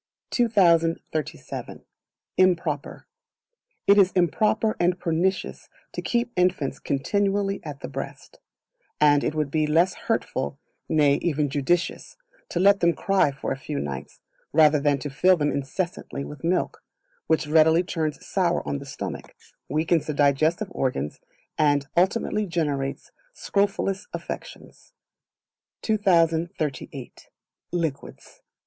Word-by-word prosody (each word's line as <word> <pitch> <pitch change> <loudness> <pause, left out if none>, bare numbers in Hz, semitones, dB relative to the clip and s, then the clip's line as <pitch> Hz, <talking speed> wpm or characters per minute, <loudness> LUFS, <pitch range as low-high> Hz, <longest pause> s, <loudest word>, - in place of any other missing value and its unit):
2037. 170 - 0 0.5
Improper. 170 -6 +1 0.8
It 200 +1 +6
is 190 -1 +5
improper 215 +5 +2
and 175 +1 +2
pernicious 175 +2 -1 0.2
to - - -4
keep 240 0 -1
infants 180 -6 +1
continually 200 +6 0
at 145 -3 -8
the - - -5
breast; - - -8 0.6
and 145 -1 +5
it 155 - -1
would 150 -3 -1
be 155 0 +1
less 170 +5 +3
hurtful, 145 - -2 0.3
nay, 145 -3 +4
even 150 -4 0
judicious, 170 - -1 0.3
to 170 - -2
let 200 +2 +5
them 170 0 +3
cry 195 -5 +2
for 135 -1 -5
a - - 0
few 145 +1 -5
nights, 70 -2 -6 0.3
rather 155 -1 +5
than 145 0 +2
to 140 +1 -6
fill 185 +6 +4
them 145 -2 +1
incessantly 140 0 -4
with 150 0 -10
milk, 175 +2 0 0.5
which 160 -1 +2
readily 160 +3 +4
turns 160 -4 -3
sour - - 0
on 70 -1 -2
the - - -10
stomach, - - -7 0.3
weakens 155 +3 +1
the 150 - -2
digestive 155 +8 +2
organs, 75 - -2 0.4
and 145 -2 +3
ultimately 205 +3 +1
generates 145 -6 -2 0.2
scrofulous 200 - -1
affections. - - -8 0.9
2038. 165 - 0 0.4
Liquids. 160 -6 -4
160 Hz, 120 wpm, -25 LUFS, 145-185 Hz, 0.9 s, It